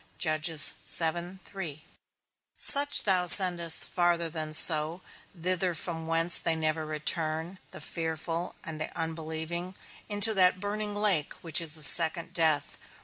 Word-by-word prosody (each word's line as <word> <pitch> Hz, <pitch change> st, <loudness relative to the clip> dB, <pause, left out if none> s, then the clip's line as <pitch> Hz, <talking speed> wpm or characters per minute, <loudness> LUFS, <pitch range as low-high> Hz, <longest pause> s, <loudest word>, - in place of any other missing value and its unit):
Such 155 Hz, -2 st, -2 dB, 2.6 s
thou 185 Hz, -3 st, 0 dB
sendest 175 Hz, -3 st, +4 dB
farther 175 Hz, -2 st, -2 dB
than 155 Hz, -1 st, -7 dB
so; 155 Hz, +2 st, +5 dB, 0.4 s
thither 180 Hz, +1 st, -3 dB
from 160 Hz, 0 st, -6 dB
whence 165 Hz, +1 st, +4 dB
they 165 Hz, -, -2 dB
never 155 Hz, 0 st, -4 dB
return: 160 Hz, +3 st, -4 dB
The -, -, -13 dB
fearful 165 Hz, +2 st, -6 dB
and 155 Hz, -1 st, -10 dB
the -, -, -6 dB
unbelieving, 160 Hz, +2 st, -7 dB, 0.3 s
into 205 Hz, +1 st, 0 dB
that 185 Hz, -2 st, +1 dB
burning 205 Hz, +1 st, -6 dB
lake 200 Hz, -8 st, -1 dB
which 165 Hz, -1 st, -1 dB
is 160 Hz, -2 st, -6 dB
the 155 Hz, -, -6 dB
second 165 Hz, +3 st, +3 dB
death. 160 Hz, -3 st, -2 dB
165 Hz, 120 wpm, -26 LUFS, 160-180 Hz, 2.6 s, so